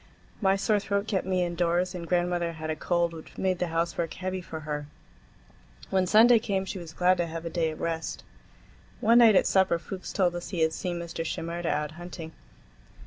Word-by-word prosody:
My 195 -1 +4
sore 200 +2 +2
throat 200 +1 -1
kept 190 -4 -1
me 185 -1 +1
indoors, 175 +1 0
and 170 -2 -6
grandmother 175 -1 0
had 160 -1 -4
a - - -2
cold 170 +1 0
which 160 -1 -11
made 185 -2 0
the 180 - 0
housework 165 0 -1
heavy 185 0 -3
for 160 -2 -7
her. 150 -1 -4 1.0
When 190 -1 +2
Sunday 230 +4 +7
came 195 -3 -1
she 190 0 -5
was 170 -2 -9
glad 180 +2 +3
to 175 - 0
have 165 +1 -6
a 165 - -4
day 165 -2 +1
of 155 - -7
rest. 165 -1 -3 0.8
One 230 +2 +5
night 225 -3 +7
at - - +5
supper 190 -3 +3
Fuchs 180 +3 -7
told 180 -3 +1
us 175 - -5
he 175 -4 -2
had 160 0 +3
seen 175 0 -3
Mr. 170 -1 -4
Shimerda 170 +1 -3
out 150 0 -1
hunting. 170 -2 -7
175 Hz, 200 wpm, -28 LUFS, 165-190 Hz, 1.0 s, Sunday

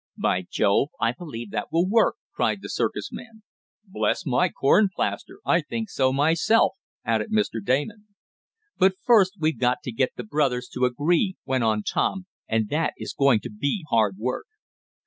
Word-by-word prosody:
"By 90 -1 0
Jove! 100 +7 +2
I 115 - +2
believe 120 - -8
that 105 - -4
will 170 +3 +2
work!" 225 +3 +3 0.2
cried - - -1
the - - -7
circus - - -2
man. 225 -2 -11 0.4
"Bless 190 -1 -1
my 155 +7 +2
corn 190 +9 +3
plaster, - - -3
I - - +3
think 225 -3 -5
so 130 -1 +2
myself!" 160 +10 +3 0.3
added - - 0
Mr. 210 - 0
Damon. 150 - -1 0.7
"But 190 0 +4
first 205 -6 +5
we've 160 0 0
got 125 +3 +1
to 130 - -4
get 130 +3 0
the 125 - -6
brothers 125 0 0
to 125 - 0
agree," 165 - +1
went 130 -2 0
on 110 -1 +1
Tom, 190 - -1 0.2
"and 110 -1 0
that 155 +2 0
is - - -6
going 135 -6 +3
to - - -7
be 140 - -2
hard 110 -4 +2
work." 125 - -3
140 Hz, 170 wpm, -24 LUFS, 120-190 Hz, 0.7 s, first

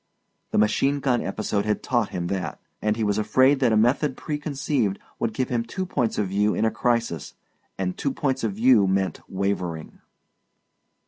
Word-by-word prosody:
The - - -1
machine 135 +7 +2
gun 130 -3 +1
episode 100 +1 -1
had 105 0 -1
taught 120 -5 +1
him 90 -1 -3
that. 95 +1 -3 0.2
And 105 0 +1
he 115 - -2
was 105 0 +1
afraid 130 +5 +4
that 125 -4 +3
a 110 - +4
method 130 +5 +2
preconceived 140 -8 -1 0.2
would 115 - 0
give 125 +3 -2
him 120 -2 0
two 185 +11 -4
points 125 -10 -1
of 105 -3 0
view 105 +2 +1
in 110 - +1
a 110 - +2
crisis 115 - -1 0.4
and 90 -1 -2
two 140 - -1
points 135 -2 -1
of 110 -3 0
view 110 -1 +5
meant 95 0 0
wavering. 90 -4 -3
110 Hz, 180 wpm, -24 LUFS, 100-130 Hz, 0.4 s, view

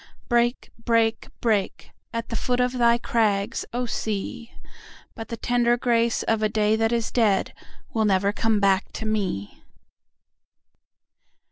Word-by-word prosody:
Break, 240 0 +1
break, 230 -1 +1
break, 215 -5 -1 0.2
At 230 0 -4
the 230 - -3
foot 245 +2 -1
of 250 0 +2
thy 235 0 +5
crags, 210 -4 0
O 245 +1 -2
Sea! 220 +1 -4 0.6
But 225 - -8
the 230 - -5
tender 240 +1 +2
grace 235 -1 +1
of 225 -1 0
a 215 - +2
day 215 0 +2
that 225 +1 +1
is 235 -1 -1
deadWill 220 0 -1
never 200 +1 +2
come 220 -1 +1
back 195 -1 +2
to 220 - -5
me. 195 - -3
225 Hz, 135 wpm, -24 LUFS, 210-235 Hz, 0.6 s, thy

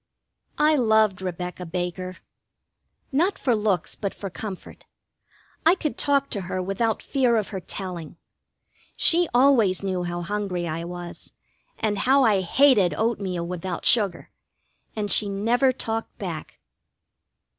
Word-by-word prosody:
I 305 +1 +4
loved 220 -6 +3
Rebecca 180 0 -5
Baker: 180 +1 -4 0.9
not 350 +9 +1
for 245 -4 +1
looks, 210 -4 0
but 200 -2 -4
for 195 -2 -6
comfort. 195 0 -8 0.8
I 335 +3 +5
could 305 -5 -3
talk 280 -1 +1
to 200 - -1
her 185 +1 -4
without 195 +5 -1
fear 255 -4 +2
of 215 -3 0
her 195 - -4
telling. 180 -3 -7 0.8
She 345 0 +4
always 240 -7 +4
knew 185 -2 -1
how 175 0 -3
hungry 190 -2 -2
I 165 +1 -4
was, 175 0 -8 0.4
and 210 -2 -1
how 270 +5 +4
I 210 -5 +3
hated 205 -1 +4
oatmeal 200 -6 -1
without 180 0 -5
sugar, 205 -6 +3 0.6
and 205 -2 -3
she 205 - +2
never 235 +7 +2
talked 225 -3 -4
back. - - -6
200 Hz, 135 wpm, -24 LUFS, 180-240 Hz, 0.9 s, I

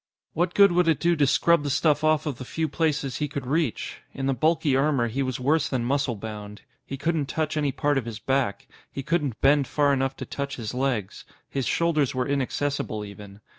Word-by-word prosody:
What 175 +2 0
good 200 -1 +7
would 175 0 +2
it 160 -3 +3
do 170 0 +2
to 145 -3 +3
scrub 170 +4 +4
the 145 - -3
stuff 150 +2 +2
off 155 0 +3
of 145 -6 -3
the - - -5
few 160 +5 -2
places 150 -3 -1
he 150 - -1
could 140 -2 -5
reach? 150 -1 -1 0.2
In 135 - -3
the 135 - +2
bulky 155 +1 +2
armor, 135 -3 +2
he 125 +5 -2
was 130 -2 -2
worse 155 +4 +2
than 125 -3 -1
muscle 135 -1 0
bound. 105 -1 -8 0.2
He 135 - -6
couldn't 155 0 -1
touch 155 0 -2
any 145 -2 +1
part 145 0 +1
of 120 - -7
his 115 -2 -5
back; 120 -2 -1 0.2
he 135 - -5
couldn't 145 -6 -1
bend 140 0 +4
far 145 -1 +2
enough 135 0 -1
to - - -5
touch 140 0 -4
his 110 -2 -5
legs. 125 -6 -2 0.2
His 135 -2 -2
shoulders 155 -6 +1
were 125 -1 0
inaccessible, 140 -5 -2
even. 100 0 -11
140 Hz, 215 wpm, -25 LUFS, 125-155 Hz, 0.2 s, good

